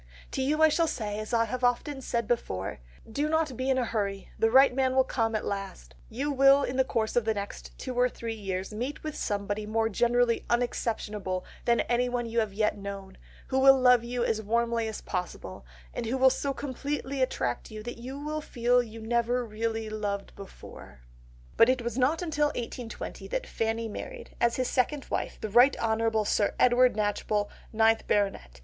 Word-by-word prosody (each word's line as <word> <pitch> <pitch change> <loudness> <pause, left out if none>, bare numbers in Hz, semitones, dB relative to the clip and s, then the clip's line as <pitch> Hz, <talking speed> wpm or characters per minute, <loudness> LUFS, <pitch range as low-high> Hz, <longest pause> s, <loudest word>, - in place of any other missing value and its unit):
To 265 - -2
you 305 +4 +2
I 315 - +8
shall 330 +2 +2
say, 210 -7 -3
as 215 +2 -6
I 230 -1 +3
have 255 +3 -5
often 255 +3 0
said 235 -3 -2
before, 95 - -2 0.3
Do 285 +7 -1
not 315 -4 +1
be 255 +3 -2
in 265 - +3
a 250 - +1
hurry, 200 -4 -3
the 225 - +4
right 265 +2 +6
man 260 0 +1
will 265 - +5
come 225 -3 -1
at 215 - -2
last; 195 - -5 0.2
you 275 +6 -2
will 275 +1 +6
in 255 - -2
the 265 - +5
course 225 -4 -1
of 240 - +3
the 220 0 0
next 200 0 -7
two 255 - -5
or 250 0 +3
three 230 -1 -5
years 195 -2 -4
meet 250 +7 -4
with 310 -1 -4
somebody 205 +1 -2
more 225 +1 +1
generally 240 +2 +2
unexceptionable 215 -6 -1 0.2
than 235 -1 +3
anyone 245 0 0
you 230 0 -1
have 215 -2 0
yet 210 +1 0
known, 195 -1 -7 0.3
who 265 - +1
will 270 0 +7
love 250 -2 +5
you 240 0 -2
as 220 -2 0
warmly 230 +1 0
as 220 - -5
possible, 175 - -5 0.3
and - - -4
who 255 +4 0
will 260 0 +6
so 280 - -1
completely 275 0 -4
attract 125 - -1
you 215 -1 -8
that 240 +1 -7
you 260 +3 -7
will 305 +2 -4
feel 245 -2 +2
you 225 -1 -9
never 240 +2 +1
really 225 0 -3
loved 205 -2 -4
before." 130 - -12 0.6
But 230 - +7
it 255 -2 +1
was 235 0 -3
not 275 +7 +1
until 300 -3 +1
1820 240 -3 -6
that - - -2
Fanny 225 - -2
married, 475 - -8
as 235 0 +3
his 255 -1 0
second 275 +2 0
wife, - - -2
the 215 - -3
Rt. 245 +6 +6
Hon. 220 -1 +1
Sir 205 0 +1
Edward 250 -1 +4
Knatchbull, 205 0 0 0.2
9th 225 0 +3
Bt. 200 -1 +2
235 Hz, 195 wpm, -28 LUFS, 215-260 Hz, 0.6 s, I